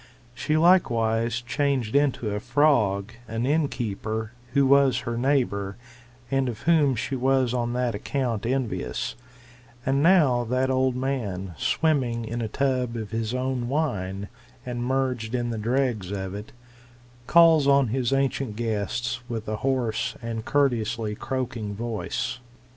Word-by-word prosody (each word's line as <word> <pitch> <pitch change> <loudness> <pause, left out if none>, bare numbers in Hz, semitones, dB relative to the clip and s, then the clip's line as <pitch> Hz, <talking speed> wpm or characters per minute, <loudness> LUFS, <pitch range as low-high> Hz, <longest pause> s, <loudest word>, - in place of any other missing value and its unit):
She 140 +6 0
likewise 115 -9 +3
changed 130 -2 -1
into 135 -6 +2
a 105 - -1
frog 115 -5 +2
an 115 +2 -2
innkeeper, 110 -7 -1 0.2
who 140 -1 +4
was 135 -2 +4
her 120 -1 -3
neighbour, 120 -7 0 0.5
and 135 -1 +1
of 115 - -6
whom 155 -5 +3
she 130 +4 -2
was 130 -1 +2
on 120 -1 -1
that 125 -1 0
account 115 0 -2
envious; 130 -2 -2 0.7
and 135 +1 +2
now 150 -8 +4
that 130 +3 +1
old 130 -1 +2
man, 110 -9 -3
swimming 125 - 0
in 120 +2 -4
a 115 - -1
tub 125 -1 0
of 110 -2 -6
his 115 +1 -2
own 130 -1 -2
wine, 100 -10 -2 0.4
and 120 -1 -3
merged 125 -3 -1
in 120 -1 -1
the 115 - -3
dregs 120 -4 0
of 95 -2 -4
it, 105 +2 -7 0.8
calls 165 -4 +6
on 140 -3 +4
his 125 +1 0
ancient 135 -4 0
guests 115 +1 -2
with 115 -2 -4
a 110 0 -2
hoarse 120 -2 -1
and 115 -1 -5
courteously 120 -6 +1
croaking 120 -3 -4
voice. 115 +2 -3
120 Hz, 140 wpm, -25 LUFS, 110-135 Hz, 0.8 s, calls